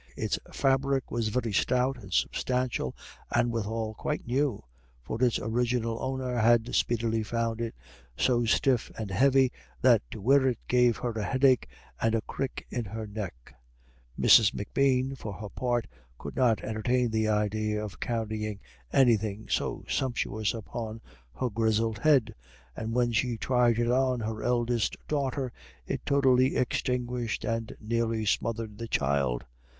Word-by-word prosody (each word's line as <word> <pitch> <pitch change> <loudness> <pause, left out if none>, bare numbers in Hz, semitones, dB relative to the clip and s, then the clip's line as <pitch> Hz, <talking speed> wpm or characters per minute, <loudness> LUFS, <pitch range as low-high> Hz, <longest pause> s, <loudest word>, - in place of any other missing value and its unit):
Its - - -1
fabric 135 0 +1
was 115 -2 0
very 115 0 -1
stout 125 +5 +2
and 95 -2 -12
substantial, 125 - 0 0.3
and 120 0 +2
withal 110 0 -2
quite - - -3
new, 130 - 0 0.4
for 115 - -3
its 120 -2 +3
original 115 0 -1
owner 130 -1 -2
had 120 +1 +3
speedily 115 -1 +1
found 115 +1 -2
it 115 - -3 0.4
so 120 -2 +2
stiff 120 +2 +2
and 110 -3 -4
heavy 135 +4 +4 0.3
that - - +5
to - - -7
wear 135 +5 +4
it 125 -3 +1
gave 125 -2 +3
her 120 - -2
a 110 -2 -3
headache 130 +2 +3 0.3
and 115 0 +2
a 115 - +1
crick 135 +4 -5
in 120 - -2
her 110 +1 -6
neck. 95 - -7 0.7
Mrs. 105 -2 +6
M'Bean, 130 +4 +1
for 110 -5 -6
her 105 +2 -7
part, 120 0 -1 0.3
could - - -8
not 120 -4 +2
entertain 120 +2 0
the 110 0 +1
idea 105 0 0
of 105 - -9
carrying 110 -3 -3 0.3
anything 110 -5 +2
so - - -1
sumptuous 115 -4 -1
upon 110 0 -6 0.4
her 125 -2 -2
grizzled 110 0 +1
head; 135 -7 +3 0.4
and 110 +1 -4
when 120 -1 +2
she 115 +1 0
tried 120 -1 +2
it 120 0 +1
on 130 -1 +2
her 110 0 -3
eldest 120 -2 0
daughter, 135 -3 -1 0.3
it - - -3
totally 130 -2 +4
extinguished 125 -2 -1
and 115 0 -3
nearly 115 0 -1
smothered 110 0 -1
the 115 - -4
child. 70 - 0
115 Hz, 145 wpm, -28 LUFS, 110-125 Hz, 0.7 s, Mrs